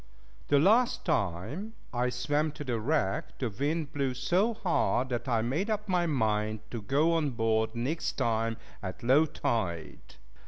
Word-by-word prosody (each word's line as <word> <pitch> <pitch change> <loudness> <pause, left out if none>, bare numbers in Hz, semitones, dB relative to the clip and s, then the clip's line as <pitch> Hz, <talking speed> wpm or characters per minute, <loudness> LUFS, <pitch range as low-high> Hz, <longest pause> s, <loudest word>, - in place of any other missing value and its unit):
The 145 - +4
last 220 - +4
time 145 - -1 0.2
I 125 0 +1
swam 145 +5 0
to 150 - -7
the 120 -4 -1
wreck, 120 -5 -1
the 125 -4 -2
wind 145 +6 -2
blew 135 -3 -1
so 180 - +1
hard, 165 - +1
that 120 -1 -3
I 115 -3 +2
made 155 - -1
up 210 -1 -1
my 180 -2 +2
mind 110 -6 0
to 115 - -4
go 145 +10 +2
on 160 -3 +1
board 110 -2 0
next 135 +8 -1
time 115 -3 0 0.2
at 95 0 -6
low 140 +6 +5
tide. 90 - -3
130 Hz, 160 wpm, -30 LUFS, 115-160 Hz, 0.2 s, low